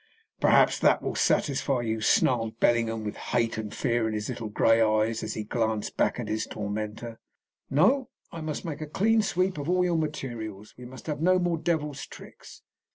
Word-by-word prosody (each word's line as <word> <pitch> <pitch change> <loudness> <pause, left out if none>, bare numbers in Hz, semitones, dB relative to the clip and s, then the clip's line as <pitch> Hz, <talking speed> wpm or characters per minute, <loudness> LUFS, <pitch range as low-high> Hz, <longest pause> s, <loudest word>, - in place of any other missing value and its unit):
"Perhaps - - +4
that - - +3
will - - -2
satisfy 135 -2 +1
you," 110 -1 -2
snarled 115 0 +2
Bellingham, 115 -2 +2
with 105 - -4 0.2
hate 115 -2 0
and 105 -1 -5
fear 120 -3 0
in 110 - -2
his 105 +2 -3
little 115 -3 -4
grey 115 +2 +3
eyes 110 +1 +2
as - - -4
he 110 - -3
glanced 110 -1 -2
back - - +1
at 120 - -4
his 110 +1 -2
tormenter. 105 +2 -5 0.5
"No; 250 - +3 0.2
I 165 - -7
must 155 +3 -4
make 155 -2 -5
a 155 - -4
clean 220 +8 +2
sweep 185 -4 0
of 145 +3 -4
all 180 0 +3
your 170 -2 +1
materials. 120 -9 -5
We 125 - -11
must 130 +1 -11
have 150 -1 -3
no 185 +2 +4
more 175 -2 0
devil's 150 -4 -2
tricks. - - -13
120 Hz, 190 wpm, -27 LUFS, 110-155 Hz, 0.5 s, Perhaps